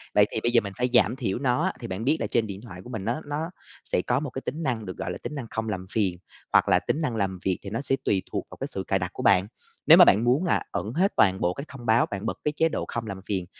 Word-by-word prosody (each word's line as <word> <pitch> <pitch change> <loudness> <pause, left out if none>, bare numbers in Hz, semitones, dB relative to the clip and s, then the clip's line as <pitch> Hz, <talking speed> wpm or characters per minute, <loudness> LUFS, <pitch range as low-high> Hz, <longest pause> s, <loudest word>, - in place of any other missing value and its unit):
Vậy - - +7
thì - - -1
bây 120 - +2
giờ 120 -1 +5
mình 100 -1 -6
phải 125 +1 +1
giảm 110 -1 +4
thiểu 120 -6 -2
nó 130 +3 +1
á. 190 - 0
Thì 115 - -6
bạn 95 +1 -4
biết 145 +6 +2
là - - 0
trên 115 -2 +1
điện 100 -1 -7
thoại 90 -6 -10
của - - -11
mình 110 -6 -5
nó 120 +7 -1
nó 150 +3 -3 0.3
sẽ - - 0
có 125 +6 +1
một 145 -1 -4
cái 130 - -6
tính 155 +5 -4
năng 120 -6 -1
được 90 -2 -7
gọi - - -3
là - - -5
tính 150 - -5
năng 130 -5 -5
không 110 0 -3
làm 95 -3 -3
phiền, 95 -5 0 0.4
hoặc - - +5
là - - +5
tính 155 - -2
năng 125 -7 -1
làm 95 -3 -1
việc, 95 -2 +1
thì 100 - -7
nó 115 +5 -3
sẽ 135 -1 +1
tùy 95 -2 +1
thuộc - - -3
vào - - -11
cái - - -4
sự 95 - -5
cài 95 - +2
đặt 90 0 -4
của - - -6
bạn. 95 0 +4 0.4
Nếu - - +10
mà - - +10
bạn 105 +4 +5
muốn 125 +7 +3
là 180 - +1
ẩn 110 - -3
hết 185 +7 +2
toàn 95 -2 +3
bộ 90 - +1
các 140 +8 -7
thông 130 -4 -11
báo, 110 +1 +4
bạn 100 +1 -6
bật - - -2
cái 150 - +1
chế 165 +1 +3
độ - - -3
không 115 -1 -4
làm 100 -2 -5
phiền, 95 -3 -2
115 Hz, 320 wpm, -26 LUFS, 95-135 Hz, 0.4 s, Nếu